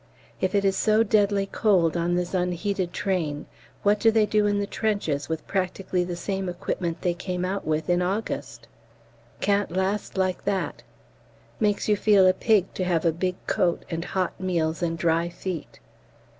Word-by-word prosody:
If 185 +1 0
it 200 0 +2
is 195 0 +3
so 215 +3 +3
deadly 205 -2 +2
cold 190 -5 +2
on 175 +1 +1
this 180 +1 -2
unheated 180 +1 -1
train, 165 -8 -2 0.4
what 205 +1 +3
do 225 - +5
they 220 -1 +4
do 210 0 +2
in 205 0 +1
the 205 - 0
trenches 200 -10 -1
with 160 -1 -3
practically 185 -1 -1
the 175 0 -4
same 190 +1 -3
equipment 175 -1 -3
they 175 - +2
came 180 0 -3
out 195 -1 -3
with 155 0 0
in 175 0 +2
August? 195 +5 -3 0.7
Can't 205 0 +2
last 190 +3 -2
like 185 -1 0
that. 195 -1 -1 0.8
Makes 210 -2 +1
you 210 - +4
feel 205 -2 +5
a 185 - +6
pig 200 -1 +2
to 185 - -2
have 175 -2 0
a 165 - +4
big 180 +2 -1
coat, 180 -5 0
and 165 0 -2
hot 185 0 -1
meals, 165 -3 0
and 165 -1 -1
dry 165 +1 +1
feet. 175 -2 -6
185 Hz, 175 wpm, -25 LUFS, 175-200 Hz, 0.8 s, a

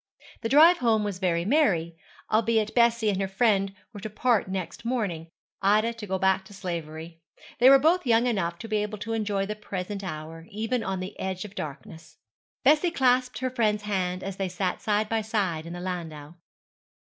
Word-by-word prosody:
The 225 - -2
drive 320 +6 +7
home 225 -3 +2
was 200 -3 -3
very 170 -3 0
merry, 190 - +2 0.4
albeit 220 -1 +2
Bessie 235 -2 +3
and 195 0 -2
her 195 - 0
friend 195 -1 +2 0.2
were 205 - -8
to 215 - -6
part 225 0 +1
next 190 0 -5
morning 205 -10 -2 0.3
Ida 215 +4 +3
to 230 -2 -9
go 190 0 -1
back 190 0 +2
to 205 - -13
slavery. 165 -3 -6 0.4
They 250 +2 +8
were 275 - +9
both 320 +3 +2
young 230 +1 +4
enough 180 -8 -1
to 225 - -8
be 215 -1 0
able 210 0 -2
to 225 +2 -4
enjoy 205 -3 -1
the 210 +1 -4
present 200 -1 -5
hour, 165 -1 -7
even 225 +3 -2
on 190 -2 -3
the 185 - -7
edge 190 0 -3
of 205 - -10
darkness. 160 -2 -8 0.5
Bessie 305 +6 +4
clasped 255 -5 +2
her 255 0 -1
friend's 215 -4 +1
hand 185 -3 -2
as 195 0 -5
they 195 -1 -2
sat 180 0 -2
side 210 0 +1
by 225 0 0
side 190 -7 -2
in 170 - -6
the 175 - -6
landau. 165 -4 -6
205 Hz, 195 wpm, -26 LUFS, 180-225 Hz, 0.5 s, were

